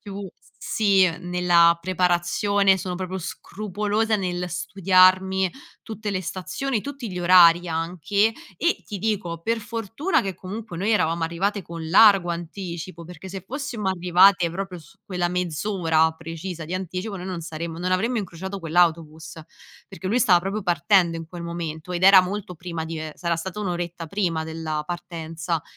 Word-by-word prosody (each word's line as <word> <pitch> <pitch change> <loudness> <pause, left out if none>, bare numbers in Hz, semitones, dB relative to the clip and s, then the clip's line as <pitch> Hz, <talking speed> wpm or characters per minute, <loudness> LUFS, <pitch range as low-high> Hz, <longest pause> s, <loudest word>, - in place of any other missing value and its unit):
più, 200 -2 -7 0.3
sì, 195 -4 +3
nella 175 -1 +4
preparazione 185 +2 +2
sono 180 -1 -4
proprio 185 +1 -4
scrupolosa 210 +4 -2
nel 180 -2 -3
studiarmi 185 +1 +3 0.3
tutte 215 -1 -5
le 185 -1 -1
stazioni, 195 +7 -3
tutti 275 -6 -6
gli 180 - -5
orari 175 -1 +6
anche. 180 +6 0 0.2
E, 340 +2 0
ti 205 -3 -6
dico, 185 -5 -2
per 230 +5 -1
fortuna 225 - -1
che 195 -2 -4
comunque 195 +1 -7
noi 200 +6 -1
eravamo 170 -6 +1
arrivate 190 +5 -1
con 165 -1 -7
largo 195 -1 +6
anticipo, 170 0 -6
perché 180 +2 -10
se 195 -1 -6
fossimo 260 -7 -4
arrivate 180 0 +4
proprio 185 0 -5
su 160 +5 -18
quella 180 -2 -1
mezz'ora 170 -2 +1
precisa 165 +1 -7
di 180 - -4
anticipo, 185 +3 -4
noi 180 - -7
non 180 -3 -4
saremmo 165 +1 -6
non 185 +1 -1
avremmo 225 +6 +1
incrociato 190 +1 -6
quell'autobus. 165 -2 0 0.5
Perché 195 -1 -8
lui 230 +6 +2
stava 180 -8 +5
proprio 195 +3 -3
partendo 170 0 +3
in 165 - -7
quel 170 +1 -9
momento, 170 0 -5
ed 175 +1 -3
era 195 0 +9
molto 185 0 -5
prima 170 -1 -5
di 160 0 -5
ehm, 155 -1 -6
sarà 170 -1 -1
stata 190 +5 -6
1 200 - -2
oretta 175 -1 -4
prima 165 -3 -1
della 160 -1 -4
partenza. 170 -1 -4
180 Hz, 160 wpm, -24 LUFS, 170-195 Hz, 0.5 s, era